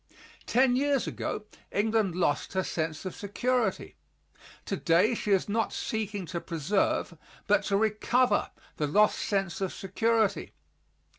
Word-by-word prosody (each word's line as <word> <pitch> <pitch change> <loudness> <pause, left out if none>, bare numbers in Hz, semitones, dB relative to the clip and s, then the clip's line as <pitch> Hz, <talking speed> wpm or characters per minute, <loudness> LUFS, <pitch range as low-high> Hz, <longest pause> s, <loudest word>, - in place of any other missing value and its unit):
Ten 250 +1 +4
years 280 0 +1
ago - - -4 0.3
England 210 -3 +1
lost 170 -3 0
her 190 0 +1
sense 160 0 -3
of 185 - -5
security. 225 +1 -1 0.7
Today 185 +3 +2
she 215 - -3
is 195 -2 +3
not 220 +1 0
seeking 210 -3 -3
to 170 0 -4
preserve, 170 +2 0 0.3
but 205 0 +3
to 200 - +1
recover, 220 +2 +2 0.3
the 150 - 0
lost 210 +8 +3
sense 195 -4 -1
of 190 - -1
security. 220 +3 0
205 Hz, 130 wpm, -28 LUFS, 185-225 Hz, 0.7 s, Ten